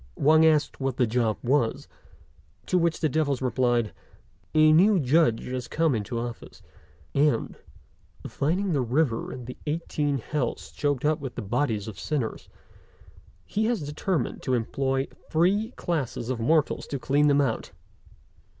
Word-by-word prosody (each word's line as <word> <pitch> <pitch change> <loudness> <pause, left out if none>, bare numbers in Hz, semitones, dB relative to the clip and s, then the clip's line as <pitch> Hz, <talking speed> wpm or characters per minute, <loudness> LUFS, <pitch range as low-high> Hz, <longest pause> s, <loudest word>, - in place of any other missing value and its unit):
Wang 155 +3 +5
asked 155 -2 +2
what 135 -2 -2
the 125 - +3
job 115 -1 0
was; 125 -2 +1 0.8
to 180 - +2
which 170 -1 0
the 155 - +3
devils 145 -3 0
replied, 120 -3 +1 0.6
"A 155 0 +6
new 190 +4 +5
Judge 135 -4 +2
has 125 -1 -4
come 160 -2 +1
into 110 +1 -3
office, 120 0 -7 0.5
and, 140 -5 +1 0.7
finding 175 +6 -1
the 140 - +1
river 125 -1 0
and 125 - -8
the 125 - -8
eighteen 150 -2 -1
hells 135 +1 -3
choked 145 -2 -1
up 155 0 +2
with 135 -3 -6
the 120 - -4
bodies 110 -1 -1
of 105 -4 -8
sinners, 140 -8 -3 1.0
he 215 +1 -1
has 225 -7 0
determined 150 0 -2
to 130 - 0
employ 135 +3 -1 0.2
three 190 +7 +2
classes 135 -7 -2
of 125 - -3
mortals 150 +6 +1
to 140 - -3
clean 140 +4 +2
them 145 -1 +4
out. 130 -6 0
140 Hz, 150 wpm, -26 LUFS, 120-155 Hz, 1.0 s, A